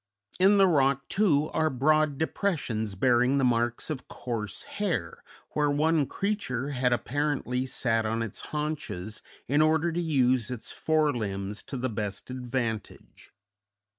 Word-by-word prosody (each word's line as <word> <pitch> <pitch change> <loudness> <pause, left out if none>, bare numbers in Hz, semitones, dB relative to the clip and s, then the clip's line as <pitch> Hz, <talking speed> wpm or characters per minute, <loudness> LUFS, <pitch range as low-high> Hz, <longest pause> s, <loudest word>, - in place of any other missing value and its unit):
In 195 +2 +6
the 195 - +7
rock, 140 -5 +2
too, 155 -8 +2
are 160 0 +2
broad 155 +2 +2
depressions 130 - -1
bearing 125 +5 +3
the 135 - +2
marks 120 +3 +1
of 130 -4 -5
coarse 110 -5 -5
hair, 175 - -3 0.3
where 150 -1 +1
one 150 0 +2
creature 145 - -2
had 125 -3 +1
apparently 130 0 -1
sat 115 -3 0
on 115 +1 -1
its 115 - -6
haunches 150 - -4 0.3
in 145 +4 +3
order 160 +2 +3
to 175 +2 -1
use 130 -7 +2
its 125 -3 -6
fore 155 -2 +1
limbs 100 -2 -3
to 135 - -6
the 130 +1 -1
best 105 0 -4
advantage. 120 -4 -4
130 Hz, 140 wpm, -28 LUFS, 115-155 Hz, 0.3 s, the